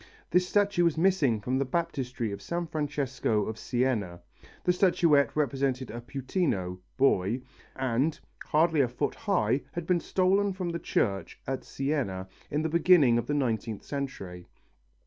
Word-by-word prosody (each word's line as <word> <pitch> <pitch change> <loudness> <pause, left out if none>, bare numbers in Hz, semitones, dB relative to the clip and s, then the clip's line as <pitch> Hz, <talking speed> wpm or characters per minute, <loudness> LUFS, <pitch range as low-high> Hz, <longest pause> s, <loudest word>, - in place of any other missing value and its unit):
This 180 0 +3
statue 205 -3 +2
was 170 -2 +2
missing 160 - +3
from 130 +5 -1
the - - +2
baptistery 130 -6 -2
of 100 0 -6
San 170 0 -3
Francesco 140 -8 -1
of 110 0 -5
Siena. 115 -9 -1 0.4
The 180 - +3
statuette 165 - +3
represented 135 -3 0
a 120 +2 -6
puttino 120 - -2 0.2
(boy) 125 -2 +2 0.3
and, 130 +4 0 0.3
hardly 160 0 +3
a 130 - +3
foot 120 +1 -2
high, 145 - +1
had 170 -1 -4
been 180 0 +2
stolen 195 +3 +2
from 185 -2 -3
the 170 0 -3
church 95 -10 -1
at 135 0 -3
Siena 130 -10 -2 0.2
in 150 +2 -1
the - - +1
beginning 155 -7 +5
of - - -4
the 145 - 0
nineteenth 115 -5 -1
century. 95 -11 -6
135 Hz, 150 wpm, -28 LUFS, 120-170 Hz, 0.4 s, beginning